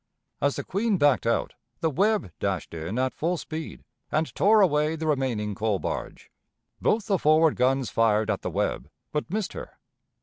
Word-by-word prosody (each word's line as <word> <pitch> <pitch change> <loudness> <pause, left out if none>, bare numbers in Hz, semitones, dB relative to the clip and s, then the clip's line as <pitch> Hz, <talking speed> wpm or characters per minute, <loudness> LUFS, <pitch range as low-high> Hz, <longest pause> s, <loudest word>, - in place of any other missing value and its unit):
As 140 0 +2
the - - -4
Queen 205 +1 0
backed 145 -6 +3
out, 115 - 0 0.3
the 160 - +1
Webb 205 - +1
dashed - - -2
in 85 +7 -4
at 130 0 0
full 175 +3 -1
speed, 160 0 -7 0.3
and 155 +1 0
tore 215 +2 +4
away 155 -3 +2
the 160 0 -4
remaining 130 -8 0
coal 105 0 0
barge. 80 - -5 0.5
Both 215 -1 +1
the 195 -5 +1
forward 155 +1 +4
guns 130 0 +1
fired 110 -1 +2
at 100 - -2
the - - -3
Webb, 65 +5 -2 0.2
but 150 +2 -2
missed 205 +1 -2
her. - - -9
150 Hz, 175 wpm, -26 LUFS, 115-170 Hz, 0.5 s, tore